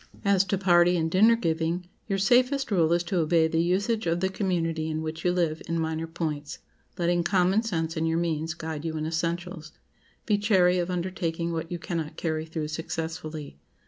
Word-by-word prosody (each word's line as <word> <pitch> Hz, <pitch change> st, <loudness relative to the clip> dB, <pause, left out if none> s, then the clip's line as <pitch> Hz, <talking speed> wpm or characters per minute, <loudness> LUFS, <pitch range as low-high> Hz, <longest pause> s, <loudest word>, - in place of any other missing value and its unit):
As 200 Hz, -1 st, +4 dB
to 195 Hz, +1 st, 0 dB
party 175 Hz, -1 st, +4 dB
and 160 Hz, -1 st, -1 dB
dinner 220 Hz, +6 st, +6 dB
giving, 165 Hz, -3 st, -1 dB, 0.2 s
your 195 Hz, -2 st, 0 dB
safest 250 Hz, +6 st, +3 dB
rule 170 Hz, -5 st, +3 dB
is 170 Hz, 0 st, +2 dB
to 175 Hz, +1 st, -1 dB
obey 160 Hz, 0 st, +3 dB
the 160 Hz, 0 st, +1 dB
usage 200 Hz, +5 st, 0 dB
of 165 Hz, +1 st, +1 dB
the 190 Hz, +1 st, +1 dB
community 165 Hz, -5 st, -1 dB
in 155 Hz, 0 st, -2 dB
which 160 Hz, +1 st, -5 dB
you 180 Hz, -, +3 dB
live 170 Hz, -3 st, 0 dB
in 165 Hz, 0 st, -1 dB
minor 160 Hz, 0 st, -2 dB
points, 155 Hz, -3 st, -4 dB, 0.4 s
letting 175 Hz, -1 st, +1 dB
common 185 Hz, +3 st, +2 dB
sense 165 Hz, -8 st, -2 dB
and 160 Hz, 0 st, 0 dB
your 165 Hz, 0 st, +1 dB
means 165 Hz, -1 st, -1 dB
guide 160 Hz, -2 st, -5 dB
you 160 Hz, -1 st, -3 dB
in 155 Hz, -, -2 dB
essentials. 170 Hz, 0 st, -3 dB, 0.5 s
Be 210 Hz, -2 st, +2 dB
chary 185 Hz, -4 st, +3 dB
of 175 Hz, +1 st, -1 dB
undertaking 170 Hz, -2 st, -2 dB
what 165 Hz, +1 st, -4 dB
you 175 Hz, -, -2 dB
cannot 165 Hz, -3 st, -4 dB
carry 160 Hz, -1 st, -2 dB
through 160 Hz, -2 st, -4 dB
successfully. 160 Hz, -, -5 dB
170 Hz, 190 wpm, -27 LUFS, 160-185 Hz, 0.5 s, dinner